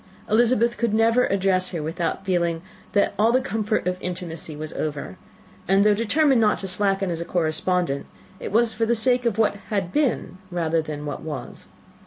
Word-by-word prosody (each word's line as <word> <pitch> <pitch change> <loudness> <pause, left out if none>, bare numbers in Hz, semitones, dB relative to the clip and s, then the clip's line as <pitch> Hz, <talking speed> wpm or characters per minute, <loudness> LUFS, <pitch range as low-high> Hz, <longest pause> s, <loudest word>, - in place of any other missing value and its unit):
Elizabeth 235 +1 +2
could 230 -3 +1
never 230 +3 +3
address 190 -1 +1
her 165 -4 -4
without 165 +4 -3
feeling 170 -3 0 0.3
that 200 - +2
all 225 +2 +4
the 255 - +4
comfort 220 -4 -1
of 180 0 -2
intimacy 170 -3 -5
was 155 +1 -6
over; 145 -11 -4 0.5
and, 195 +2 +4
though 210 - +6
determined 245 +4 +2
not 210 -1 +3
to 195 - -5
slacken 195 0 0
as 165 0 -3
a - - -1
correspondent, 170 -2 -1 0.3
it - - -6
was 230 +1 +4
for 225 +1 0
the 235 - +2
sake 245 +2 +2
of 220 -3 -1
what 215 -2 +2
had 195 -4 -2
been 270 -10 0
rather 165 -2 0
than 150 -1 -6
what 145 - -5
was. 150 -6 -7
195 Hz, 185 wpm, -23 LUFS, 170-225 Hz, 0.5 s, though